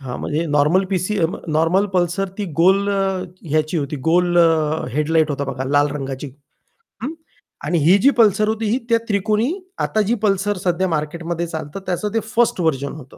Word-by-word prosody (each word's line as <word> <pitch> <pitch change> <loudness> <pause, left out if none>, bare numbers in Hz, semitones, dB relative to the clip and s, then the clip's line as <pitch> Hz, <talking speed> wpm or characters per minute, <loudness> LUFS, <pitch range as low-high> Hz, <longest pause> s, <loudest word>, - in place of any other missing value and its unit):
हां, 125 -3 -6
म्हणजे 155 +3 -2
normal 150 +6 +3
PC 190 +2 -1 0.3
normal 165 +6 +2
Pulsar 180 +2 0
ती 205 - -1 0.2
गोल 195 +3 +4
अ, 195 -1 +1 0.5
ह्याची 155 +2 +1
होती 145 +1 -3
गोल 175 +1 +3
अ, 160 -2 +2
हेडलाइट 155 +1 +2
होता 140 0 -2
बघा, 130 +1 -4
लाल 145 +2 +2
रंगाची 135 0 -5 0.7
हं, 300 +5 -3 0.5
आणि 170 +3 +1
ही 185 +4 +6
जी 275 - +7
पल्सर 215 -1 +4
होती, 220 +1 -1
ही 245 - +2
त्या 230 - +5
त्रिकोणी 210 +5 +1 0.3
आता 215 - 0
जी - - +3
पल्सर 200 0 +1
सध्या 180 +1 +1
मार्केटमध्ये 170 +2 -3
चालतं 160 +1 -6
त्याचं 200 +4 -2
ते 225 - +2 0.2
1st 235 -5 +2
व्हर्जन 140 -4 0
होतं. 140 -4 -12
170 Hz, 175 wpm, -20 LUFS, 150-200 Hz, 0.7 s, जी